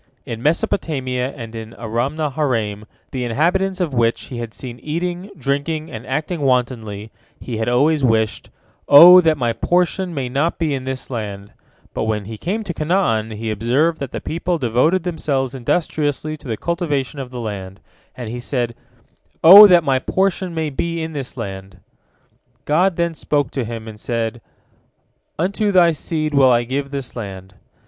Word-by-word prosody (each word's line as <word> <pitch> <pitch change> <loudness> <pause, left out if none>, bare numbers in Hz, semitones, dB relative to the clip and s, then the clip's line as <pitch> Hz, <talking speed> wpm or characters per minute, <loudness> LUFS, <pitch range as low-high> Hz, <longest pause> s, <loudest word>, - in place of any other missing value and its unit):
In 115 0 -6
Mesopotamia 135 -4 -1
and 115 -4 -8
in 110 0 -8
Aramnaharaim, 120 -3 -2 0.3
the 130 -2 -3
inhabitants 180 - 0
of 170 -6 -1
which 115 -1 +1
he 125 - -6
had 115 -1 -5
seen 120 0 -9
eating, 175 +4 -4
drinking, 145 +3 -2
and 110 - -8
acting 155 +5 -2
wantonly, 115 -5 -1 0.3
he 120 -3 -5
had 110 +1 -1
always 145 +4 +2
wished, 110 -3 +1 0.4
"O 175 +5 +10
that 160 -3 +2
my 120 -3 0
portion 180 +4 0
may 135 -3 -2
not 140 +7 0
be 160 -4 0
in 130 -1 -4
this 130 0 -5
land," 100 -4 -5 0.4
but - - -2
when 105 -2 -2
he 110 +2 -7
came 195 - -3
to 185 -4 -5
Canaan, 155 - 0
he 110 0 -3
observed 130 +10 +1
that 140 -3 -5
the - - -4
people 170 +2 -2
devoted 145 +7 +1
themselves 140 -7 -2
industriously 150 +2 -1
to 145 - -13
the 110 -2 -3
cultivation 150 - -2
of 130 -2 -6
the 125 -1 -7
land, 100 -4 -6 0.4
and 120 -3 -6
he 120 +3 -5
said, 120 -1 -2 0.7
"O 200 +5 +12
that 175 -3 +5
my 135 -3 +2
portion 190 +2 -1
may 160 -2 -2
be 170 +4 -2
in 160 0 -5
this 135 -3 -6
land!" 95 -4 -7 0.9
God 175 +5 +2
then 170 0 0
spoke 145 -4 -1
to 135 - -2
him, 115 -1 -6
and 110 -1 -9
said, 115 0 -3 1.0
"Unto 200 +5 0
thy 175 -3 +5
seed 155 -1 -3
will 135 -2 +5
I 120 -1 +3
give 135 +3 -3
this 140 -3 -6
land." 95 -4 -7
135 Hz, 170 wpm, -20 LUFS, 115-165 Hz, 1.0 s, O